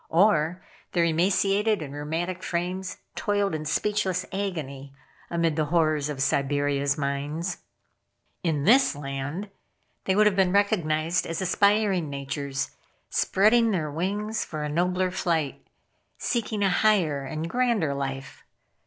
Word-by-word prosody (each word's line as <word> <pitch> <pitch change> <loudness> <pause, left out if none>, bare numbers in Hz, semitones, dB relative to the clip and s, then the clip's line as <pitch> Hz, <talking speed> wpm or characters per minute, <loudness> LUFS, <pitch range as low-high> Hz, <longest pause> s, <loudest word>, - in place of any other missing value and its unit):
Or 175 -1 +3 0.3
their 170 - +3
emaciated 195 +4 +2
and 140 -1 -8
rheumatic 165 +5 -3
frames 180 +2 -3 0.2
toiled 205 -3 0
in 155 -1 -3
speechless 190 +2 0
agony 145 -9 -4 0.3
amid 170 -2 +1
the 155 -1 +1
horrors 155 -2 +1
of 135 -3 -1
Siberia's 140 0 +1
mines. 145 +5 -2 0.9
In 155 -5 0
this 240 - +5
land 145 +7 -5 0.5
they 190 - +2
would 210 +1 +5
have 210 -2 +3
been 190 -2 +3
recognized 170 -5 +1
as 165 0 -3
aspiring 195 -2 +2
natures, 140 0 -3 0.4
spreading 225 +4 +3
their 160 -8 -1
wings 205 +7 -2
for 155 -2 -5
a 150 - -2
nobler 180 +3 +1
flight, 165 -6 -1 0.5
seeking 220 -3 -1
a 195 - +4
higher 180 -10 +2
and 155 +4 -4
grander 235 - +1
life. 135 -1 -5
170 Hz, 125 wpm, -26 LUFS, 150-195 Hz, 0.9 s, this